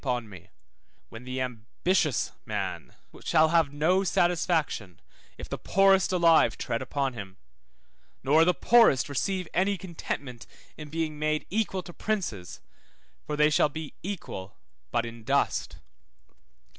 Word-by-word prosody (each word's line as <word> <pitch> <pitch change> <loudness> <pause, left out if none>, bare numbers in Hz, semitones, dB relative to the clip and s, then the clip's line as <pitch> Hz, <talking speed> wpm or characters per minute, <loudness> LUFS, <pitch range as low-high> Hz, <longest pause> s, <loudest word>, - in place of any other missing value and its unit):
upon 125 -4 -1
me; 95 -5 -13 0.6
when 115 +2 -10
the 130 +1 -4
ambitious 130 - -1
man - - -4 0.3
shall 155 0 +4
have 165 -3 +3
no 165 +7 +2
satisfaction, 165 - 0 0.4
if - - -8
the - - -5
poorest 195 -1 +3
alive 165 -9 +4
tread 115 - -3
upon 135 +1 -2
him, 100 -4 -9 0.9
nor 150 +5 +5
the 180 - +4
poorest 225 - +4
receive 180 +6 -2
any 195 +2 +1
contentment 145 -8 -6 0.3
in 150 -1 -9
being 155 -1 -3
made 155 0 0
equal 195 -3 -1
to 175 - -11
princes, 170 - -3 0.7
for 150 - -2
they 150 +1 +4
shall 150 - +3
be 155 0 -7
equal 160 - -6 0.3
but 120 - 0
in 115 -1 -9
dust. 140 +5 0
150 Hz, 130 wpm, -27 LUFS, 125-180 Hz, 0.9 s, nor